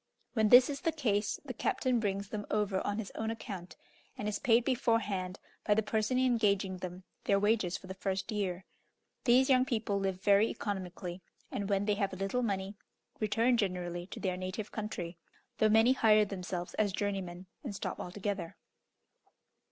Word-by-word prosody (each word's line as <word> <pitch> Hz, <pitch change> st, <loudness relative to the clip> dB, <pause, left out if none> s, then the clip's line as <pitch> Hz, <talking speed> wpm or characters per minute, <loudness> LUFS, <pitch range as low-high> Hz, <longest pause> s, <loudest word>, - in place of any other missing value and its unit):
When 220 Hz, -3 st, +3 dB
this 250 Hz, +2 st, +9 dB
is 280 Hz, -1 st, -4 dB
the 330 Hz, -, +1 dB
case, 215 Hz, -10 st, 0 dB
the 260 Hz, -, -5 dB
captain 250 Hz, +1 st, +1 dB
brings 200 Hz, -2 st, -2 dB
them 205 Hz, -1 st, -5 dB
over 205 Hz, -3 st, +1 dB
on 205 Hz, 0 st, -2 dB
his 220 Hz, -3 st, -4 dB
own 220 Hz, 0 st, -2 dB
account, 195 Hz, -5 st, -6 dB, 0.4 s
and 210 Hz, -, -3 dB
is 210 Hz, -1 st, -1 dB
paid 235 Hz, -2 st, +4 dB
beforehand, 210 Hz, -7 st, 0 dB, 0.2 s
by 210 Hz, -, +3 dB
the 220 Hz, -, +2 dB
person 220 Hz, +4 st, 0 dB
engaging 210 Hz, -7 st, +2 dB
them, 180 Hz, 0 st, -7 dB, 0.2 s
their 200 Hz, -, +4 dB
wages 205 Hz, -3 st, +2 dB
for -, -, -14 dB
the 190 Hz, -, -6 dB
first 190 Hz, +3 st, -2 dB
year. 190 Hz, -3 st, -2 dB, 0.6 s
These 255 Hz, +1 st, +5 dB
young 255 Hz, -2 st, +5 dB
people 220 Hz, -5 st, -1 dB
live 190 Hz, -1 st, -1 dB
very 200 Hz, +2 st, +5 dB
economically, 185 Hz, -4 st, -4 dB, 0.3 s
and 200 Hz, 0 st, -3 dB
when 200 Hz, 0 st, +1 dB
they 210 Hz, -, +2 dB
have 195 Hz, -, 0 dB
a -, -, -5 dB
little 195 Hz, +6 st, -1 dB
money, 195 Hz, -3 st, -1 dB, 0.5 s
return 225 Hz, +3 st, +2 dB
generally 180 Hz, -4 st, -2 dB
to -, -, -8 dB
their 185 Hz, -2 st, -1 dB
native 185 Hz, +3 st, -4 dB
country, 180 Hz, -6 st, -5 dB, 0.4 s
though 215 Hz, -, +5 dB
many 225 Hz, +4 st, +6 dB
hire 215 Hz, -4 st, +5 dB
themselves 180 Hz, -3 st, -5 dB
as 210 Hz, -2 st, +3 dB
journeymen, 190 Hz, -3 st, -3 dB, 0.2 s
and 230 Hz, -8 st, -5 dB
stop -, -, -4 dB
altogether. 190 Hz, -1 st, -4 dB
205 Hz, 175 wpm, -32 LUFS, 190-225 Hz, 0.6 s, this